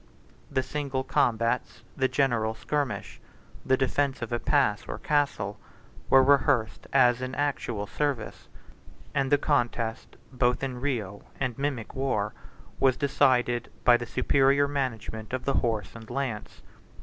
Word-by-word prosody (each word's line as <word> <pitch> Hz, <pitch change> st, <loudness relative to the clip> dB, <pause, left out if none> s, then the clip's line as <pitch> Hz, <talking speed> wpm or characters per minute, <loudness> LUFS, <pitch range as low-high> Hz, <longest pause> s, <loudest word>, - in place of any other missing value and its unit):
The 130 Hz, -, 0 dB
single 140 Hz, -2 st, -3 dB
combats, 120 Hz, -4 st, 0 dB
the 130 Hz, -2 st, +2 dB
general 120 Hz, -6 st, +1 dB
skirmish, 140 Hz, +4 st, -3 dB, 0.4 s
the 130 Hz, -, +2 dB
defence 135 Hz, -1 st, 0 dB
of 120 Hz, -, -5 dB
a 120 Hz, -, 0 dB
pass, 130 Hz, -9 st, +1 dB
or -, -, -4 dB
castle, 125 Hz, -9 st, 0 dB, 0.5 s
were 135 Hz, 0 st, +7 dB
rehearsed 135 Hz, -4 st, +2 dB
as 125 Hz, -2 st, +4 dB
in 130 Hz, +1 st, -4 dB
actual 135 Hz, -7 st, -1 dB
service; 140 Hz, 0 st, -3 dB, 0.7 s
and 135 Hz, -1 st, 0 dB
the 145 Hz, -, +6 dB
contest, 120 Hz, -5 st, -1 dB, 0.2 s
both 125 Hz, 0 st, +1 dB
in 125 Hz, -2 st, -3 dB
real 110 Hz, -8 st, -2 dB, 0.2 s
and 130 Hz, -3 st, -1 dB
mimic 135 Hz, -5 st, -3 dB
war, 130 Hz, -6 st, -1 dB, 0.5 s
was 130 Hz, -2 st, +3 dB
decided 125 Hz, -4 st, +2 dB
by 120 Hz, -, +7 dB
the 120 Hz, 0 st, -2 dB
superior 140 Hz, +3 st, +3 dB
management 115 Hz, -5 st, -4 dB
of 130 Hz, -1 st, -3 dB
the 140 Hz, -, +1 dB
horse 110 Hz, -5 st, -2 dB
and 115 Hz, -1 st, -11 dB
lance. 130 Hz, -6 st, -4 dB
130 Hz, 135 wpm, -27 LUFS, 115-140 Hz, 0.7 s, were